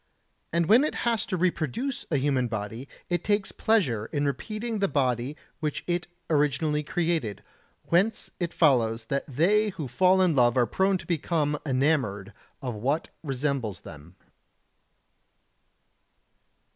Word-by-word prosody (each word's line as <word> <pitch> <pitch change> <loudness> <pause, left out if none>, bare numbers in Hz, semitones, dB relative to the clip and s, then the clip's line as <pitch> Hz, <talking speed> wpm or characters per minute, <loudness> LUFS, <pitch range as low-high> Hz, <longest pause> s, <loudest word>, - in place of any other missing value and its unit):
And 170 +1 +2
when 225 - +6
it 305 - -1
has 230 -2 +1
to 185 - -1
reproduce 185 - -1
a 150 - +1
human 135 -2 +1
body, 110 +3 -5 0.2
it 175 -1 -1
takes 205 -1 +1
pleasure 130 - +1
in 145 -1 -1
repeating 215 - -3
the 200 - +2
body 130 -1 0 0.2
which 150 -2 -3
it 175 0 -1 0.2
originally 150 0 +1
created; 160 - -1 0.5
whence 200 +6 +1
it 175 -2 -1
follows 115 -7 +2
that 140 0 -1
they 195 - +2
who 160 -8 -5
fall 185 +8 +3
in 180 -3 +3
love 120 -1 +4
are 125 - +5
prone 190 - +1
to - - -11
become 155 -3 0
enamoured 130 -8 0 0.3
of 125 -2 -2
what 135 +9 -1
resembles 135 - -2
them. 80 +3 -12
150 Hz, 135 wpm, -27 LUFS, 125-180 Hz, 0.5 s, when